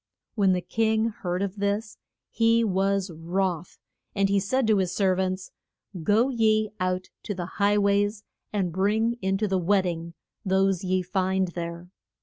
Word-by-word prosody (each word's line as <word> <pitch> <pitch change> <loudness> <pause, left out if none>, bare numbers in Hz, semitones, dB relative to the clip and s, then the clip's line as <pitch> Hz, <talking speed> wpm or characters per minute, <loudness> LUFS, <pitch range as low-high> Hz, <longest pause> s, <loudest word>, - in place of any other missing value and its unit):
When 195 -4 +3
the 180 - 0
king 220 +3 +1
heard 180 -3 -3
of 200 +1 -4
this 205 +2 -2 0.3
he 230 0 +3
was 195 -2 0
wroth, 175 +1 -2 0.4
and 195 -1 +2
he 200 0 +3
said 260 +7 0
to 220 -2 +3
his 185 -2 0
ser 190 -2 +3
vants, 185 0 -2 0.5
Go 215 +10 +3
ye 215 -4 +2
out 185 0 -2
to 205 - -4
the 180 -1 -4 0.2
high 205 +1 +4
ways 205 +1 +1 0.3
and 195 -4 -1
bring 220 +5 +1
in 190 0 +1
to 210 +1 0
the 190 -1 +1
wed 190 +2 +3
ding 170 -1 -4 0.3
those 190 -1 +1
ye 185 0 0
find 190 0 0
there. 170 +1 -6
195 Hz, 165 wpm, -26 LUFS, 185-210 Hz, 0.5 s, high